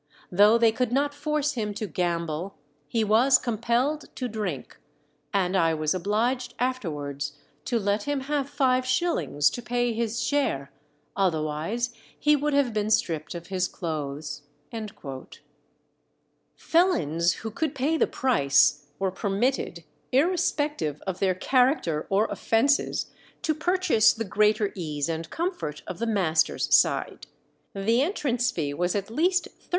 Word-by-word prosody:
Though 205 Hz, +5 st, +6 dB
they 230 Hz, -1 st, +4 dB
could 245 Hz, +1 st, -1 dB
not 285 Hz, +3 st, +1 dB
force 300 Hz, 0 st, -1 dB
him 210 Hz, -5 st, -3 dB
to 215 Hz, -, -3 dB
gamble, 170 Hz, -1 st, -2 dB, 0.3 s
he 225 Hz, -1 st, 0 dB
was 230 Hz, +6 st, +5 dB
compelled 240 Hz, +6 st, 0 dB
to 255 Hz, -, -3 dB
drink, 210 Hz, -, -5 dB, 0.5 s
and 190 Hz, -1 st, +1 dB
I 165 Hz, -3 st, +3 dB
was 155 Hz, -1 st, 0 dB
obliged 235 Hz, +7 st, -1 dB
afterwards 145 Hz, -, -3 dB, 0.3 s
to 240 Hz, -, 0 dB
let 205 Hz, -1 st, 0 dB
him 290 Hz, -2 st, -1 dB
have 280 Hz, 0 st, -2 dB
five 260 Hz, -3 st, +2 dB
shillings 255 Hz, -, +1 dB
to 245 Hz, -, -5 dB
pay 240 Hz, 0 st, 0 dB
his 230 Hz, 0 st, -2 dB
share, 140 Hz, -, 0 dB, 0.4 s
otherwise 170 Hz, +6 st, -1 dB, 0.3 s
he 300 Hz, 0 st, +4 dB
would 295 Hz, +1 st, -1 dB
have 275 Hz, -5 st, +2 dB
been 210 Hz, 0 st, -1 dB
stripped 165 Hz, -6 st, 0 dB
of 170 Hz, 0 st, -7 dB
his 185 Hz, -1 st, 0 dB
clothes." 150 Hz, -3 st, -5 dB, 2.1 s
Felons 170 Hz, -, +2 dB
who 220 Hz, -, -3 dB
could 310 Hz, +6 st, -2 dB
pay 285 Hz, +5 st, +1 dB
the -, -, +2 dB
price 145 Hz, -, +2 dB
were 190 Hz, +2 st, -1 dB
permitted, 195 Hz, -1 st, -1 dB, 0.3 s
irrespective 290 Hz, -, +1 dB
of 190 Hz, -1 st, -3 dB
their 190 Hz, -2 st, +2 dB
character 250 Hz, -, +1 dB
or 200 Hz, +3 st, +3 dB
offences, 275 Hz, +6 st, +1 dB, 0.3 s
to 315 Hz, -, +2 dB
purchase 350 Hz, -, +3 dB
the 225 Hz, -, -3 dB
greater 210 Hz, +1 st, +2 dB
ease 150 Hz, -5 st, -3 dB
and 165 Hz, 0 st, -4 dB
comfort 325 Hz, -, -3 dB
of 185 Hz, -, -7 dB
the 230 Hz, -, -1 dB
master's 180 Hz, -7 st, +1 dB
side. -, -, +1 dB, 0.5 s
The 225 Hz, +5 st, +2 dB
entrance 270 Hz, -, 0 dB
fee 145 Hz, -4 st, -2 dB
was 175 Hz, +5 st, -1 dB
at 200 Hz, +1 st, -3 dB
least 360 Hz, +8 st, +2 dB
13_s. -, -, -27 dB
215 Hz, 140 wpm, -26 LUFS, 170-265 Hz, 2.1 s, Though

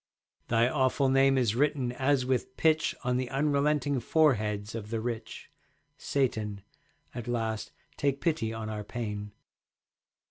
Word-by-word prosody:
Thy 115 Hz, +1 st, +3 dB
awful 130 Hz, 0 st, +2 dB
name 135 Hz, 0 st, +4 dB
is 120 Hz, -5 st, +2 dB
written 135 Hz, -1 st, +1 dB
as 130 Hz, +1 st, +1 dB
with 130 Hz, 0 st, -1 dB
pitch 160 Hz, -1 st, +2 dB
On 125 Hz, 0 st, +1 dB
the 130 Hz, -1 st, -2 dB
unrelenting 145 Hz, 0 st, +1 dB
foreheads 110 Hz, -8 st, +1 dB
of 110 Hz, -2 st, -6 dB
the 115 Hz, 0 st, -1 dB
rich. 115 Hz, -1 st, -5 dB, 0.4 s
Satan, 110 Hz, -9 st, -1 dB, 0.5 s
at 120 Hz, -1 st, -6 dB
last 115 Hz, -3 st, -2 dB, 0.3 s
take 140 Hz, -2 st, 0 dB
pity 150 Hz, -10 st, 0 dB
on 110 Hz, -1 st, -5 dB
our 105 Hz, -1 st, -4 dB
pain. 105 Hz, -2 st, -5 dB
125 Hz, 135 wpm, -29 LUFS, 110-140 Hz, 0.5 s, name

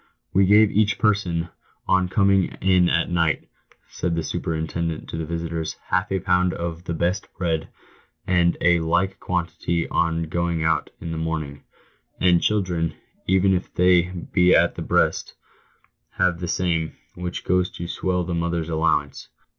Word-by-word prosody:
""We 95 Hz, 0 st, +4 dB
give 105 Hz, +1 st, +6 dB
each 105 Hz, -1 st, +2 dB
person, 90 Hz, -6 st, 0 dB, 0.4 s
on 95 Hz, -1 st, +2 dB
coming 100 Hz, -1 st, +3 dB
in 90 Hz, -2 st, +3 dB
at 85 Hz, +1 st, +1 dB
night," 85 Hz, -2 st, +1 dB, 0.4 s
said 85 Hz, -1 st, -2 dB
the 80 Hz, -, -1 dB
superin 80 Hz, +1 st, -3 dB
tendent 85 Hz, -1 st, -3 dB
to -, -, -5 dB
the 80 Hz, -1 st, -4 dB
visitors, 85 Hz, -1 st, -3 dB
" -, -, -29 dB
half 90 Hz, +1 st, +1 dB
a 95 Hz, -, +1 dB
pound 90 Hz, -1 st, +1 dB
of 85 Hz, 0 st, -5 dB
the 85 Hz, -, -3 dB
best 90 Hz, +4 st, -1 dB
bread, 80 Hz, -3 st, -1 dB, 0.6 s
and 90 Hz, -2 st, +2 dB
a 85 Hz, 0 st, +4 dB
like 85 Hz, +4 st, 0 dB
quantity 85 Hz, -1 st, -2 dB
on 85 Hz, 0 st, 0 dB
going 85 Hz, 0 st, -1 dB
out 80 Hz, 0 st, +1 dB
in 85 Hz, -, -6 dB
the 80 Hz, -, -3 dB
morning; 80 Hz, -3 st, -4 dB, 0.6 s
and 90 Hz, -2 st, +4 dB
children, 90 Hz, -6 st, 0 dB, 0.3 s
even 95 Hz, +1 st, +3 dB
if 90 Hz, -, -2 dB
they 90 Hz, -1 st, +4 dB, 0.2 s
be 90 Hz, 0 st, +5 dB
at -, -, +4 dB
the -, -, -7 dB
breast, -, -, 0 dB, 0.8 s
have 90 Hz, -2 st, +1 dB
the 90 Hz, -, -4 dB
same, 80 Hz, -2 st, -1 dB, 0.2 s
which 90 Hz, 0 st, -5 dB
goes 90 Hz, 0 st, +2 dB
to 85 Hz, -, -5 dB
swell 90 Hz, 0 st, -1 dB
the 85 Hz, 0 st, -4 dB
mother's 85 Hz, -1 st, -1 dB
allowance. 80 Hz, 0 st, 0 dB
85 Hz, 160 wpm, -23 LUFS, 80-90 Hz, 0.8 s, give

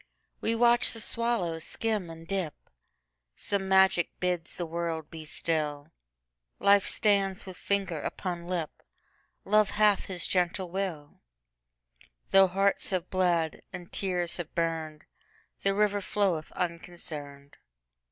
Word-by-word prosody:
We 225 Hz, -, 0 dB
watch 240 Hz, +1 st, +4 dB
the 225 Hz, -, -3 dB
swallow 225 Hz, -8 st, 0 dB
skim 210 Hz, +1 st, -2 dB
and 165 Hz, 0 st, -10 dB
dip; 185 Hz, -6 st, -2 dB, 0.8 s
Some 195 Hz, -1 st, 0 dB
magic 190 Hz, -2 st, +5 dB
bids 180 Hz, -2 st, -2 dB
the 175 Hz, -, -2 dB
world 165 Hz, -1 st, -3 dB
be 160 Hz, -2 st, -8 dB
still; 150 Hz, -2 st, -2 dB, 0.7 s
Life 200 Hz, 0 st, +4 dB
stands 200 Hz, -2 st, +2 dB
with 185 Hz, -1 st, -8 dB
finger 195 Hz, -5 st, -1 dB
upon 175 Hz, -2 st, -4 dB
lip; 175 Hz, -4 st, -2 dB, 0.7 s
Love 210 Hz, 0 st, +4 dB
hath 210 Hz, -1 st, +3 dB
his 185 Hz, -2 st, -4 dB
gentle 180 Hz, 0 st, 0 dB
will; 175 Hz, -6 st, -4 dB, 1.1 s
Though 195 Hz, 0 st, +7 dB
hearts 195 Hz, +2 st, +1 dB
have 185 Hz, -2 st, -2 dB
bled, 175 Hz, -4 st, +1 dB
and 180 Hz, -2 st, -9 dB
tears 180 Hz, -3 st, -1 dB
have 170 Hz, -3 st, -7 dB
burned, 160 Hz, -2 st, -2 dB, 0.6 s
The 195 Hz, 0 st, +2 dB
river 205 Hz, -1 st, +2 dB
floweth 190 Hz, -6 st, 0 dB
unconcerned. 160 Hz, -5 st, -6 dB
180 Hz, 125 wpm, -29 LUFS, 165-195 Hz, 1.1 s, Though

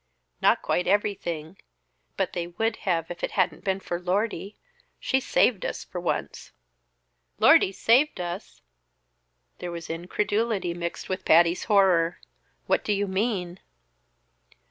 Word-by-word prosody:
"Not -, -, +3 dB
quite 180 Hz, -, 0 dB
everything, 185 Hz, -4 st, -1 dB, 0.6 s
but 195 Hz, -, -1 dB
they 170 Hz, -1 st, -3 dB
would 225 Hz, +6 st, -2 dB
have 165 Hz, -1 st, 0 dB
if 175 Hz, -, -8 dB
it -, -, -2 dB
hadn't 180 Hz, -5 st, 0 dB
been 190 Hz, -1 st, 0 dB
for 175 Hz, -2 st, -4 dB
Lordy. 200 Hz, +3 st, -2 dB, 0.4 s
She 265 Hz, -, +1 dB
saved 240 Hz, -5 st, +2 dB
us -, -, -4 dB
for 180 Hz, -, -7 dB
once." 175 Hz, -, -3 dB, 0.9 s
"Lordy -, -, +6 dB
saved 250 Hz, +8 st, +3 dB
us!" 175 Hz, +3 st, -6 dB, 1.0 s
There 180 Hz, -, -5 dB
was 170 Hz, -1 st, -6 dB
incredulity 205 Hz, +2 st, -1 dB
mixed 170 Hz, 0 st, -5 dB
with 185 Hz, 0 st, -3 dB
Patty's 170 Hz, +1 st, +4 dB
horror. 185 Hz, -5 st, +3 dB, 0.5 s
"What -, -, +1 dB
do 210 Hz, -, 0 dB
you 200 Hz, 0 st, 0 dB
mean?" 190 Hz, -3 st, -2 dB
185 Hz, 130 wpm, -26 LUFS, 175-205 Hz, 1.0 s, Lordy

